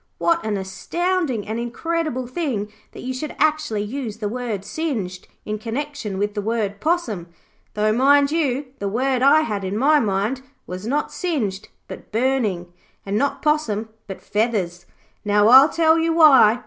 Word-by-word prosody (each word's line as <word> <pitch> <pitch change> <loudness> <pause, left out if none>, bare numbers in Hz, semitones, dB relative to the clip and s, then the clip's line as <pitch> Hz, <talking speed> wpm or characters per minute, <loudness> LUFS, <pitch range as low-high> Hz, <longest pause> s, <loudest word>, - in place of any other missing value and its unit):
What 335 -7 +1
an 215 -2 -1
astounding 260 - -2
and 220 +2 -3
incredible 255 +2 -2
thing 240 -7 -3 0.2
that - - -10
you 260 +1 -3
should 295 +4 -5
actually 300 -9 +1
use 225 -1 -5
the 215 -2 -3
word 220 -3 -4
"singed" 220 - -4 0.2
in 215 0 -3
connexion 235 -2 -4
with 205 +1 -1
the 205 - -2
word 205 -2 -2
"possum". 250 - -1 0.5
Though 215 0 +2
mind 280 +4 +4
you, 290 -4 0
the 200 - -2
word 255 +4 0
I 280 +4 +6
had 210 -9 -3
in 190 +2 -3
my 295 +5 +4
mind 215 +4 -1 0.2
was 185 +4 -7
not 290 +5 -1
"singed", 245 - -3 0.2
but - - -10
"burning". 215 -8 0 0.3
And 200 +1 -2
not 275 +5 0
"possum", 230 -9 0 0.2
but 195 - -8
"feathers". 200 -5 -1 0.4
Now, 210 +1 +3
I'll 265 +4 +9
tell 325 0 +3
you 325 0 +1
why. 270 -8 +6
235 Hz, 160 wpm, -22 LUFS, 205-290 Hz, 0.5 s, I'll